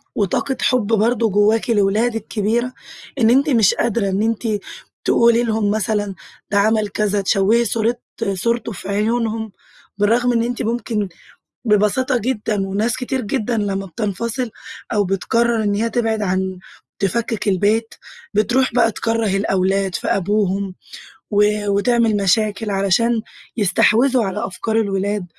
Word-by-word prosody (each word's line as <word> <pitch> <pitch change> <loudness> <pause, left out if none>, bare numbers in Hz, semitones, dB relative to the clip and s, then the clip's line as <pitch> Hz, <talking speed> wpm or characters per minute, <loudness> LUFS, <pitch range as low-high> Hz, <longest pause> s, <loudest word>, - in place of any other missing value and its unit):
وطاقة 225 +7 -1
حب 250 -5 +2
برضو 225 +1 +2
جوّاكِ 210 +4 +2
لولادك 220 +1 +1
كبيرة، 235 +4 -1 0.5
إن 225 -2 +4
أنتِ 275 +5 +3
مش 225 -7 +4
قادرة 225 -3 0
إن 190 +2 0
أنتِ 230 +1 -1 0.6
تقولي 235 0 +4
لهم 220 -3 0
مثلًا 210 -2 -1 0.4
ده 205 - +2
عمل 215 0 +2
كذا، 205 0 0
تشوهي 205 +4 +2
صورة 230 +2 0 0.4
صورته 235 +4 -1
في 195 -1 -8
عيونهم، 220 +1 -1 0.5
بالرغم 235 +4 +2
إن 230 -1 +2
أنتِ 245 0 -3
ممكن 225 -3 -2 0.6
ببساطة 215 +5 +2
جدًا 210 -4 -2
وناس 210 +5 0
كتير 260 +1 -2
جدًا 235 +1 -2
لمّا 195 -2 -2
بتنفصل 220 +6 -3 0.4
أو 205 - +2
بتقرر 225 +4 +1
إن 205 -1 0
هيّ 225 +3 0
تبعد 225 -2 0
عن 190 -1 -1 0.4
تفكك 220 +3 -1
البيت، 210 +4 +1 0.4
بتروح 245 +5 +2
بقى 230 -2 +3
تكرَّه 225 -2 0
الأولاد 195 -1 0
في - - -3
أبوهم، 200 -1 0 0.6
و 205 0 +4 0.3
وتعمل 225 +2 +2
مشاكل 205 +2 +1
علشان 200 +4 +1 0.4
يستحوذوا 235 +5 +3
على 190 - -3
أفكار 220 +4 -3
الولاد، 200 -1 -1
215 Hz, 130 wpm, -19 LUFS, 200-235 Hz, 0.6 s, إن